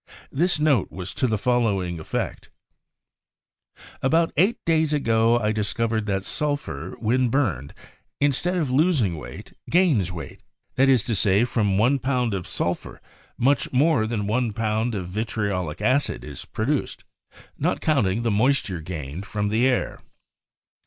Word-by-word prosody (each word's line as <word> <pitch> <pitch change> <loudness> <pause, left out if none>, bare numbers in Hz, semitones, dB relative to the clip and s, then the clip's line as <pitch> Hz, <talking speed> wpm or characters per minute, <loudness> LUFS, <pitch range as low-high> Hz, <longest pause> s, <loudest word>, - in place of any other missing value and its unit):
This 175 +6 +1
note 145 -9 +2
was 90 0 -6
to 130 - 0
the 110 -2 0
fol 125 +3 +1
lowing 95 -6 -1
effect: 80 - -4 1.5
"About 165 +5 +2
eight 195 +9 +3
days 160 -2 +2
ago 115 -4 +3
I 110 -2 0
discovered 110 +1 -1
that 95 -1 -1
sulphur, 145 - -2
when 125 +2 +1
burned, 100 - -1 0.4
instead 145 +6 +1
of 150 -7 -1
losing 135 - +2
weight, 75 - -10 0.2
gains 155 - +3
weight; 80 -6 -8 0.3
that 135 +1 +3
is 130 -5 +4
to 115 - -2
say, 100 +2 +3
from 105 -5 0
one 125 +7 +3
pound 125 -4 0
of 95 -3 -4
sulphur - - -3 0.4
much 135 +1 +2
more 130 -4 +3
than 110 -3 -2
one 115 +1 0
pound 110 +1 -1
of 90 -3 -4
vitriolic 100 -5 -3
acid 135 +3 +1
is - - -7
produced, 135 +6 -2 0.6
not - - 0
counting 115 -8 +1
the 115 - +1
mois 130 +7 +3
ture 90 -4 -5
gained 80 +1 -6
from 105 -1 -2
the 115 +5 +2
air. 130 - -1
115 Hz, 150 wpm, -24 LUFS, 100-135 Hz, 1.5 s, is